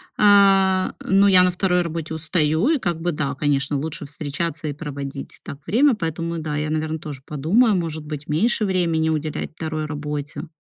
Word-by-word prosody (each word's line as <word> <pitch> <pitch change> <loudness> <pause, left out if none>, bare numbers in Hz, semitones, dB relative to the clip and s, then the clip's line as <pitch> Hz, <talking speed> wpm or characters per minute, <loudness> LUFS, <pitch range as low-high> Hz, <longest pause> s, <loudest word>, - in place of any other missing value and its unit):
А, 195 -2 +4
но 195 +1 +4
я 185 -2 +7
на 180 - +3
2 180 0 +1
работе 165 -2 -4
устаю, 160 - +1
и 320 -3 +2
как 170 -7 -2
бы, 175 +1 0
да, 140 -2 -2
конечно, 140 0 0
лучше 155 +2 -5
встречаться 150 +2 -4
и 145 - -2
проводить 140 -2 -7
так 140 - -8
время, 260 +3 +4
поэтому, 165 -2 -3
да, 155 -1 -3
я, 150 +1 -2
наверно, 155 0 -2
тоже 145 -4 -8
подумаю, 195 - +2
может 160 -3 -3
быть, 150 -1 -7
меньше 215 +9 +1
времени 170 -4 +1
уделять 155 -1 -3
2 155 -1 -4
работе. 150 +2 -5
160 Hz, 175 wpm, -22 LUFS, 150-180 Hz, -, я